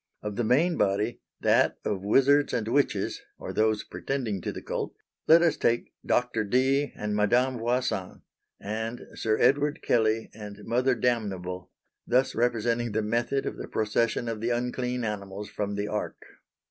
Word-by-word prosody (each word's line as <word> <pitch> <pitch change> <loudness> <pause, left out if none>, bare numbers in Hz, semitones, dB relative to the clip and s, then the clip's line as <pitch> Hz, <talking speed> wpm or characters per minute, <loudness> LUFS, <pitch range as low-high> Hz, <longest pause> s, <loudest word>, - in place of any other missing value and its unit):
Of 105 -1 -4
the 120 - 0
main 150 +10 +3
body, 105 +4 0 0.2
that - - +3
of 100 -3 -1
Wizards 135 +8 +4
and 110 - -1
Witches 140 +4 0 0.2
or - - -6
those 110 -1 +2
pretending 120 -9 -3
to - - -3
the - - -6
cult, - - -4 0.3
let 165 +2 +7
us 170 - +3
take 120 0 0
Doctor 125 -3 +1
Dee 130 +6 +2
and 105 0 -3
Madame 120 +5 +2
Voisin, 120 -5 -1 0.4
and 110 +3 -4
Sir 110 -1 0
Edward 145 +1 +2
Kelley 110 -1 +1
and 105 -1 -9
Mother 125 +2 +2
Damnable 95 -7 -2 0.4
thus 130 +2 +2
representing 120 -1 0
the 110 - 0
method 120 +5 0
of - - -4
the - - -6
procession 115 +2 0
of 115 -2 -3
the 115 - 0
unclean 125 +1 -1
animals 100 -1 -4
from 100 -1 -3
the 100 0 -2
Ark. 105 0 -3
115 Hz, 160 wpm, -27 LUFS, 105-125 Hz, 0.4 s, let